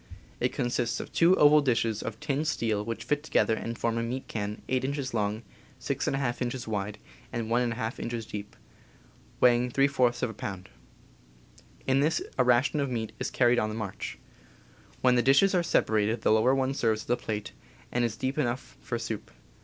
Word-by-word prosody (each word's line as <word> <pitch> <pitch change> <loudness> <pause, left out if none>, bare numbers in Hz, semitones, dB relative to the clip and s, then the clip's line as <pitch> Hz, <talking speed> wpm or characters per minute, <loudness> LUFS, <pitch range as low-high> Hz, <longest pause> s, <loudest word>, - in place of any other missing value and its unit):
It - - +1
consists 120 -1 -1
of - - -7
two 170 +2 +5
oval 150 +1 +7
dishes 115 -5 +1
of 115 0 -5
tinned 150 0 -1
steel 110 -8 0
which 115 +1 -4
fit 150 0 0
together 150 -6 +2
and 115 +1 -4
form 115 0 0
a - - 0
meat 125 +3 -4
can 105 -1 -4
8 130 0 0
inches 135 -1 -2
long, 105 0 -1 0.4
6^ 135 -3 -1
inches 125 0 -3
wide, 105 -1 -3 0.3
and 115 -1 -3
1^ 120 -1 0
inches 115 -1 -4
deep, 105 -1 -7 0.8
weighing 125 0 +4
f 140 0 +2
of 120 -1 +3
a - - -11
pound. 95 -2 -6 1.2
In 135 0 +3
this 155 +3 +2 0.2
a - - +6
ration 125 +5 +3
of 140 -1 0
meat 115 -3 -3
is - - -2
carried 120 -1 +3
on 110 - 0
the 110 - -5
march. 105 -4 -5 0.8
When 125 -1 +5
the 120 - +4
dishes 135 - +5
are 180 - +3
separated 110 -8 +1
the - - +4
lower 110 +5 +4
one 135 0 0
serves 110 -5 0
as - - -19
a - - +5
plate, 105 -3 -4 0.4
and 120 - +1
is 115 -2 -1
deep 130 +4 -2
enough 125 -2 -2
for 120 - -3
soup. 115 -2 -5
120 Hz, 185 wpm, -28 LUFS, 110-135 Hz, 1.2 s, oval